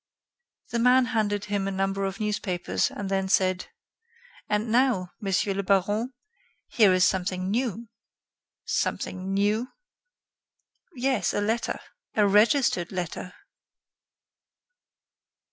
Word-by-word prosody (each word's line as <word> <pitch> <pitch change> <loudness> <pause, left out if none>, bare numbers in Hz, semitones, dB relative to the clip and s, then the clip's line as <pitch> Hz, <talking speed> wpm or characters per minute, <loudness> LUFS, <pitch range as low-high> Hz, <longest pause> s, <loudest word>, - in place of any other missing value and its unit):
The 235 - 0
man 250 +2 +5
handed 205 -2 0
him 200 -1 -1
a - - -1
number 195 +1 -1
of 195 +2 -4
newspapers, 210 -4 -1
and 200 - -6
then 190 0 -1
said: 185 -1 +2 0.8
"And 210 +2 0
now, 235 -7 +2
Monsieur 195 0 0
le 195 - -1
Baron, 205 +5 +1 0.6
here 210 -5 +4
is 185 0 +4
something 185 0 -1
new." 235 -1 -2 0.8
"Something 185 +1 -2
new?" 205 +5 +1 1.3
"Yes, 260 -2 0
a - - +1
letter. 225 +3 -1 0.4
A 210 -1 +4
registered 210 - +3
letter." 180 0 -5
200 Hz, 110 wpm, -26 LUFS, 190-225 Hz, 1.3 s, man